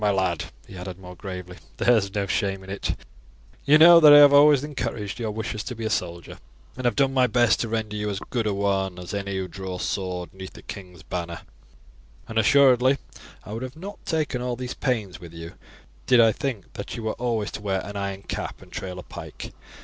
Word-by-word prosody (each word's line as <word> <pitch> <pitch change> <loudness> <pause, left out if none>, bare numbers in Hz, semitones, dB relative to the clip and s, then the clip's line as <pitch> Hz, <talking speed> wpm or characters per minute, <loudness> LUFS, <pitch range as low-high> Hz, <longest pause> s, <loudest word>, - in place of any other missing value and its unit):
My 105 - +4
lad," 95 -5 0 0.2
he 95 - -12
added 90 0 -7
more 90 -1 -11
gravely, 90 -1 -8 0.2
"there 120 - +4
is 100 -2 -1
no 100 -1 0
shame 95 0 -1
in 95 - -9
it; 100 - -2 0.7
you 150 +2 +7
know 170 +2 +9
that 155 -2 +9
I 145 - +11
have 145 -1 +8
always 145 -1 +7
encouraged 125 -9 -4
your 115 -2 -2
wishes 110 0 -4
to 125 - -5
be 115 0 -5
a 110 - -1
soldier, 85 -4 -3 0.4
and 130 - -6
have 120 -3 +2
done 135 +3 +2
my 130 -1 +4
best 120 0 +3
to 115 - -1
render 110 -1 -2
you 105 0 -2
as 100 - -3
good 115 -3 0
a 105 - +1
one 95 -2 0
as 90 +1 -7
any 100 -1 -3
who 95 -1 -3
draws 95 -1 -6
sword 90 -2 -3
'neath 95 0 -9
the - - -13
king's 90 -5 -10
banner, 85 -1 -5 0.9
and 110 0 0
assuredly 130 +2 +5 0.5
I 105 - -8
would 125 +4 -5
not 195 +5 -8
have - - -29
taken 155 -6 -1
all 125 -1 -2
these 125 +1 -5
pains 105 -9 -2
with 85 -1 -11
you 85 +1 -8 0.5
did 125 -2 +6
I 115 -1 +7
think 120 -6 -5
that - - -6
you 115 - -6
were 110 - -1
always 115 -4 -1
to - - -7
wear 95 -2 -1
an 100 - -8
iron 100 -1 -4
cap - - -5
and - - -18
trail 90 -1 -6
a 90 - -7
pike. - - -9
105 Hz, 225 wpm, -25 LUFS, 95-125 Hz, 0.9 s, I